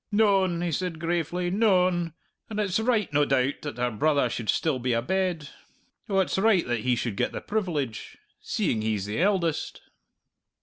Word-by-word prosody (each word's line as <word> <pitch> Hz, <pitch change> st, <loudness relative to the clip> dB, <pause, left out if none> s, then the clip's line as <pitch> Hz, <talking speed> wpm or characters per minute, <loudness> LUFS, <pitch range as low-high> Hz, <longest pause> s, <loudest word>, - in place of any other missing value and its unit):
"Noan," 195 Hz, -5 st, +3 dB
he 175 Hz, -, -1 dB
said 175 Hz, +1 st, -2 dB
gravely, 175 Hz, +2 st, -1 dB
"noan. 180 Hz, -5 st, +2 dB, 0.4 s
And 215 Hz, -1 st, -4 dB
it's 200 Hz, -1 st, +1 dB
right, 220 Hz, -, +1 dB
no 145 Hz, +1 st, +4 dB
doubt, 135 Hz, -1 st, +1 dB
that 145 Hz, -3 st, -6 dB
her 125 Hz, 0 st, 0 dB
brother 140 Hz, +2 st, +1 dB
should 115 Hz, -3 st, -4 dB
still 150 Hz, -5 st, +1 dB
be 125 Hz, 0 st, 0 dB
abed 160 Hz, +5 st, -1 dB, 0.6 s
oh, 195 Hz, -, +1 dB
it's 190 Hz, -, -1 dB
right 210 Hz, -3 st, +3 dB
that 120 Hz, -2 st, -1 dB
he 125 Hz, +2 st, +1 dB
should 115 Hz, -3 st, -3 dB
get -, -, -1 dB
the -, -, -3 dB
privilege 165 Hz, -, -3 dB, 0.2 s
seeing 110 Hz, -, -1 dB
he's 110 Hz, -3 st, -1 dB
the 105 Hz, +9 st, -2 dB
eldest!" 180 Hz, -5 st, 0 dB
170 Hz, 170 wpm, -26 LUFS, 125-190 Hz, 0.6 s, no